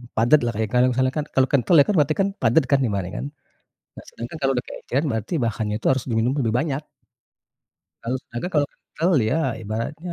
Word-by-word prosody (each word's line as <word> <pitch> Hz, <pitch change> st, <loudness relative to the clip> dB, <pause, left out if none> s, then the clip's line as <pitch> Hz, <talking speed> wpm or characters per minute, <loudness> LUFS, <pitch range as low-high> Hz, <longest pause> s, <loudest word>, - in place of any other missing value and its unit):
padat 120 Hz, +7 st, +5 dB
lah 120 Hz, -, 0 dB
kayak 110 Hz, -1 st, -1 dB
kalau 125 Hz, 0 st, +5 dB
misalnya 130 Hz, +1 st, +1 dB
kan 150 Hz, -, -1 dB
kalau 130 Hz, 0 st, +4 dB
kental 140 Hz, +5 st, +3 dB
ya 140 Hz, -, +8 dB
kan 210 Hz, -, +1 dB
berarti 150 Hz, 0 st, +3 dB
kan 195 Hz, -, +2 dB
padat 120 Hz, +6 st, +4 dB
kan 140 Hz, -, +5 dB
ibaratnya 95 Hz, -3 st, -3 dB
kan, -, -, -4 dB, 0.7 s
nah -, -, -11 dB
sedangkan 120 Hz, +6 st, -8 dB
kalau 135 Hz, 0 st, +2 dB
udah 125 Hz, -, -2 dB
keenceran 140 Hz, +5 st, -3 dB
berarti 110 Hz, -, -3 dB
bahannya 110 Hz, -2 st, -2 dB
itu -, -, -6 dB
harus 130 Hz, -2 st, -2 dB
diminum 115 Hz, +2 st, +1 dB
lebih 115 Hz, -2 st, 0 dB
banyak. 145 Hz, -1 st, -2 dB, 1.2 s
Kalau 125 Hz, +3 st, -1 dB
sedangkan 120 Hz, +7 st, -6 dB
kalau 145 Hz, -1 st, +3 dB
kental 170 Hz, +4 st, -2 dB, 0.2 s
ya 160 Hz, -, +1 dB, 0.2 s
ibaratnya 115 Hz, -, -4 dB
125 Hz, 200 wpm, -23 LUFS, 115-145 Hz, 1.2 s, ya